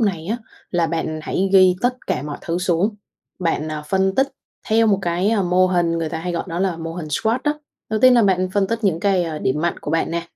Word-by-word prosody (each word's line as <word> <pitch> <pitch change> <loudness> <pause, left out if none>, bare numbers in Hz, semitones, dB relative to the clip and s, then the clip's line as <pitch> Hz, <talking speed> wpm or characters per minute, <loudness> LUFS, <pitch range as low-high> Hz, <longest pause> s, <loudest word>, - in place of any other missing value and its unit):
này 185 -7 0
á, 225 +5 -1 0.3
là 170 -2 +1
bạn 160 -1 -3
hãy 190 +4 -1
ghi 185 -2 +6
tất 250 +1 +1
cả - - -1
mọi 145 0 -6
thứ 170 +1 -2
xuống, 185 +4 +1 0.4
bạn, 165 -3 -1
ờ, 155 -1 -4
phân 190 +1 +1
tích 270 +4 +2 0.4
theo 225 +1 +4
một 200 -2 +3
cái, 175 +4 +1
ơ, 210 -4 +2
mô 180 +1 +3
hình 175 -2 +1
người 165 - -2
ta 160 0 -4
hay 175 +2 -3
gọi 170 - -2
đó 170 - -3
là 185 -2 0
mô 165 0 -5
hình 165 -3 -5
SWOT 220 - +1
á. 295 - +3 0.4
Đầu 215 -1 0
tiên 255 +1 +7
là 240 - +5
bạn 185 -2 +2
phân 195 0 +1
tích 230 +2 -3
những 175 -4 +1
cái, 195 -3 +2
ơ, 160 -2 -4
điểm 150 +1 -1
mạnh 170 0 -1
của - - -6
bạn 165 +1 0
nè, 170 0 -2
180 Hz, 260 wpm, -21 LUFS, 165-200 Hz, 0.4 s, tiên